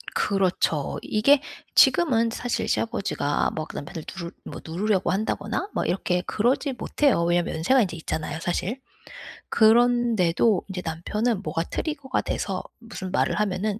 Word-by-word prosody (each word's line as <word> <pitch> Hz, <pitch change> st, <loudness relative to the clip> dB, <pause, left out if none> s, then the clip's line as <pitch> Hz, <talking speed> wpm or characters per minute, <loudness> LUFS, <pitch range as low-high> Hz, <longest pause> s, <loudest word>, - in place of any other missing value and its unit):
그렇죠. 185 Hz, -7 st, 0 dB
이게 270 Hz, +7 st, +4 dB, 0.3 s
지금은 230 Hz, -9 st, +5 dB
사실 245 Hz, 0 st, -2 dB
시아버지가 220 Hz, -10 st, 0 dB
막 155 Hz, 0 st, -4 dB
그 -, -, -11 dB
남편을 160 Hz, +2 st, -6 dB
누르 170 Hz, -3 st, -6 dB
뭐 -, -, -8 dB
누르려고 190 Hz, +4 st, 0 dB
한다거나 215 Hz, -, -2 dB
막 -, -, -1 dB
이렇게 180 Hz, -1 st, 0 dB
그러지 255 Hz, +8 st, 0 dB
못해요. 250 Hz, -, +1 dB
왜냐하면 175 Hz, 0 st, +1 dB
연세가 245 Hz, +11 st, +3 dB
인제 175 Hz, -5 st, -2 dB
있잖아요 160 Hz, -1 st, -4 dB
사실. 180 Hz, +8 st, -2 dB, 0.7 s
그런데도 225 Hz, -4 st, +3 dB
인제 185 Hz, -2 st, -5 dB
남편은 205 Hz, +7 st, -1 dB
뭐가 165 Hz, -3 st, -2 dB
trigger가 280 Hz, -, -3 dB
돼서 190 Hz, -2 st, -3 dB, 0.2 s
무슨 225 Hz, -5 st, -7 dB
말을 210 Hz, -, +1 dB
하면은 210 Hz, +1 st, -1 dB
200 Hz, 365 characters per minute, -25 LUFS, 175-235 Hz, 0.7 s, 지금은